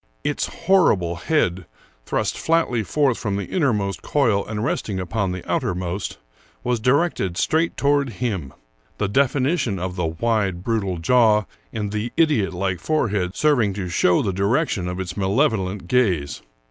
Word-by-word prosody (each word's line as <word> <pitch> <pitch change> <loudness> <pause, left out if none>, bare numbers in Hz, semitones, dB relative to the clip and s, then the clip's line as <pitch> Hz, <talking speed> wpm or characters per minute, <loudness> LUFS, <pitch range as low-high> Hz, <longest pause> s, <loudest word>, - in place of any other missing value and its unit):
Its - - -1 0.2
horrible 100 - +3
head, 90 - 0 0.4
thrust - - -1
flatly 160 -8 +1
forth 135 +3 +1
from 100 -3 -2
the 100 - -2
innermost 105 - 0
coil 115 -9 +1
and 105 0 -4
resting 100 -5 -2
upon 95 +2 -1
the 90 -1 -6
outermost, 90 +2 -2 0.5
was 120 -1 0
directed 125 - +1
straight 165 +8 +1
toward 140 -1 +2
him, 95 - -3 0.5
the 105 - 0
definition 135 - +1
of 90 0 -4
the 90 -3 -1
wide, 95 0 -1
brutal 100 -5 -1
jaw 105 +3 +4 0.3
and 105 -2 -3
the 110 +3 -3
idiotlike 100 - +1
forehead 100 - 0
serving 125 -10 +2
to 95 -3 -4
show 90 0 +3
the 95 - -1
direction 100 - 0
of 90 +1 -4
its 90 -1 -4
malevolent 100 - 0
gaze. 90 - +1
105 Hz, 145 wpm, -22 LUFS, 95-125 Hz, 0.5 s, jaw